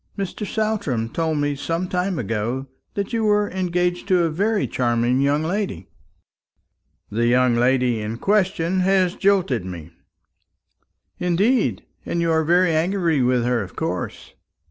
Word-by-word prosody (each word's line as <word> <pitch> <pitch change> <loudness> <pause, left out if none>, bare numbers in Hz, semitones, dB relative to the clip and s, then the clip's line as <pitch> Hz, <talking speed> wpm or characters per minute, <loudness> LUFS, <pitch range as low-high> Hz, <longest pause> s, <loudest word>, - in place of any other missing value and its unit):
Mr. 200 +2 -4
Saltram 200 - -1
told 160 +3 -1
me 145 0 0
some 165 +6 -2
time 180 0 -1
ago 115 +3 -2 0.3
that 200 +3 -3
you 225 -1 0
were 210 -1 +2
engaged 180 -1 -1
to 185 -3 +3
a 165 - 0
very 205 +6 0
charming 120 0 +1
young 145 +2 +2
lady." 165 - -3 1.2
"The 115 +3 +1
young 125 0 +3
lady 125 -1 +2
in 110 +2 -4
question 190 - +1
has 185 -1 +2
jilted 190 - +1
me." 85 -3 -8 1.3
"Indeed! 200 +8 +1 0.2
And 170 - -2
you 170 -1 +1
are 160 0 +2
very 175 +2 +3
angry 165 -2 +1
with 125 -1 +2
her, 120 -1 +1
of 95 - -8
course?" - - -4
165 Hz, 145 wpm, -22 LUFS, 125-190 Hz, 1.3 s, to